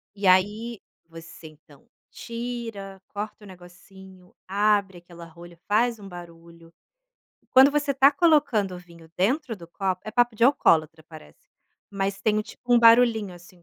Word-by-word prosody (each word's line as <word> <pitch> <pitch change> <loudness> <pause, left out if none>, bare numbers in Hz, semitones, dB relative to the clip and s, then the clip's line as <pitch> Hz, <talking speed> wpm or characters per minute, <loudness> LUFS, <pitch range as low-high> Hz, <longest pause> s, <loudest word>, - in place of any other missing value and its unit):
E 200 0 -6
aí 205 +5 +1 0.3
você, 165 0 -13
então, 150 -2 -20 0.2
tira, 230 -5 -7
corta 210 +1 -7
o - - -13
negocinho, 185 0 -16
abre 200 -1 0
aquela 170 -1 -14
rolha, 170 +1 -15
faz 230 +2 +1
um 200 - -11
barulho. 170 -1 -14 0.8
Quando 265 +2 +6
você 290 -1 -1
tá 270 +1 +5
colocando 285 - +1
o - - -8
vinho 170 -2 -17
dentro 250 - -1
do 170 -3 -14
copo, 185 0 -3
é 215 - -6
papo 240 0 +1
de 215 - -6
alcoólatra 160 - +2
parece, 155 - -16 0.4
mas 195 0 -3
tem 215 +1 +1
um, - - -1
tipo, 245 +3 -6
um - - +6
barulhinho, 230 -4 +4
assim, 175 0 -18
195 Hz, 155 wpm, -24 LUFS, 175-230 Hz, 0.8 s, Quando